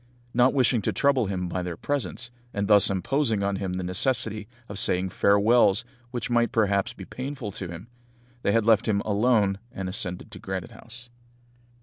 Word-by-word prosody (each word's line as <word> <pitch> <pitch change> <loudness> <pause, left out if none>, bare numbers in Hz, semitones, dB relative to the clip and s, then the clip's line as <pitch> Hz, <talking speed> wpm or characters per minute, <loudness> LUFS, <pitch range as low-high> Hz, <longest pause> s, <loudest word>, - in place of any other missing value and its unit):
Not 125 +2 +4
wishing 125 -3 +3
to - - 0
trouble 140 -6 +2
him 90 -2 -2
by 90 +1 -3
their 90 -2 -5
presence, 120 -3 -3 0.2
and 100 0 -1
thus 105 -1 +6
imposing 110 - 0
on 100 0 0
him 95 -2 -3
the 90 0 -3
necessity 105 +2 -1 0.2
of 100 -1 -4
saying 95 0 +2
farewells 100 +2 +4 0.2
which 120 -2 -4
might 120 -1 +2
perhaps 105 0 +1
be 125 - -10
painful 130 -4 -6
to 95 -1 -6
him, 85 +5 -9 0.5
they 100 - +1
had 115 0 +2
left 110 -1 +4
him 100 -2 +1
alone, 105 -2 +2
and 95 -1 -5
ascended 90 +2 -5
to 95 - -10
Granite 95 +3 -5
House. 120 +1 -13
105 Hz, 180 wpm, -26 LUFS, 95-120 Hz, 0.5 s, thus